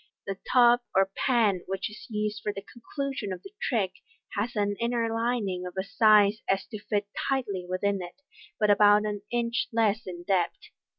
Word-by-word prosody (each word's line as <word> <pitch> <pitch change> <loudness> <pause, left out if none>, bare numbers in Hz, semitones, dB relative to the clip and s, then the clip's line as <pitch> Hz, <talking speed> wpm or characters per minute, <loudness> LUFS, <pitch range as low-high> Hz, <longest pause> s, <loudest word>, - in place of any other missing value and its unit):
The 195 -1 -4
tub 240 -1 +6 0.2
or 195 0 +3
pan 220 -8 +2
which 190 0 -2
is 210 - -11
used 210 -1 -2
for 210 - -1
the 200 -1 -8
conclusion 245 -1 -5
of 185 - -6
the 390 - -11
trick 205 -7 0 0.4
has 225 +4 -2
an 205 -1 0
inner 235 -1 0
lining 225 -6 -1
of 180 - -8
such 190 0 -2
a - - -17
size 215 -1 +5
as 195 0 +1
to 215 - -5
fit 205 0 -1 0.2
tightly 205 -10 -1
within 195 +1 0
it, 180 +11 -10 0.4
but 210 -1 +4
about 205 +1 +5
an 205 -1 -3
inch 235 0 0
less 225 -2 +1
in 175 -1 -7
depth. 180 -2 -1
210 Hz, 185 wpm, -27 LUFS, 195-235 Hz, 0.4 s, tub